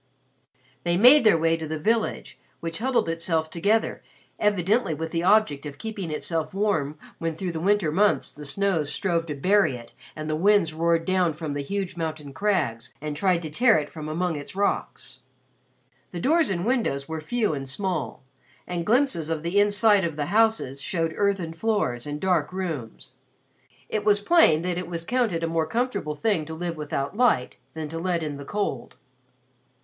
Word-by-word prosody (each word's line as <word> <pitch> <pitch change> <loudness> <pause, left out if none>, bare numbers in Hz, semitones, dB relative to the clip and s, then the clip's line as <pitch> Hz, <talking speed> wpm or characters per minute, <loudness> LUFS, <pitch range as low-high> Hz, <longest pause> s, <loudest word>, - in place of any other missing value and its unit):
They 175 0 +1
made 255 +7 +8
their 215 -6 +5
way 165 0 +2
to 160 -1 -5
the 155 +1 -3
village, 220 +8 -1 0.2
which 165 +2 -5
huddled 250 -3 +1
itself 165 -1 -1
together 205 +7 0 0.4
evidently 205 -2 +1
with 160 +2 -5
the 165 - -1
object 185 -7 +3
of 140 -1 -9
keeping 215 -6 -5
itself 160 +2 -3
warm 160 -8 0 0.2
when 165 -1 -2
through 180 +2 -3
the 165 - -4
winter 195 -2 +2
months 205 +5 +2
the 150 - -10
snows 160 0 0
strove 170 -3 -1
to 150 - -4
bury 185 -1 +3
it 120 -1 -11 0.2
and 155 0 -5
the 155 - 0
winds 190 -1 +3
roared 165 +1 +1
down 185 -3 +2
from 155 -1 -5
the 145 - -2
huge 190 +4 -4
mountain 155 -4 -4
crags 155 - -1
and 150 0 -4
tried 175 +1 +1
to 155 - -6
tear 235 +7 +4
it 150 -1 -3
from 155 -1 -7
among 170 +1 -1
its 145 +4 -7
rocks. 200 +1 -2 0.9
The 175 - -5
doors 315 - +3
and 180 -1 -2
windows 220 - 0
were 160 -1 -4
few 220 +2 0
and 135 -2 -5
small, 180 -1 -3 0.4
and 175 -1 -3
glimpses 220 - +2
of 160 -1 -2
the 175 +4 +1
inside 205 0 +4
of 165 -3 -2
the 145 -1 -2
houses 220 - +2
showed 165 +1 -1
earthen 195 -5 0
floors 165 - -1
and 145 0 -4
dark 180 -5 +1
rooms. 165 -12 -5 0.7
It 215 - -2
was 205 -1 +4
plain 205 - +4
that 180 -1 -1
it 180 - -5
was 170 -1 -3
counted 225 -9 0
a - - +1
more 165 -1 0
comfortable 225 -10 -2
thing 200 -1 0
to 160 +1 -7
live 170 0 -3
without 145 0 -3
light 225 - +2 0.2
than 160 -1 -4
to 165 +1 -5
let 170 -1 -1
in 150 -2 -4
the 140 - -9
cold. 205 +6 -3
170 Hz, 185 wpm, -25 LUFS, 155-205 Hz, 0.9 s, made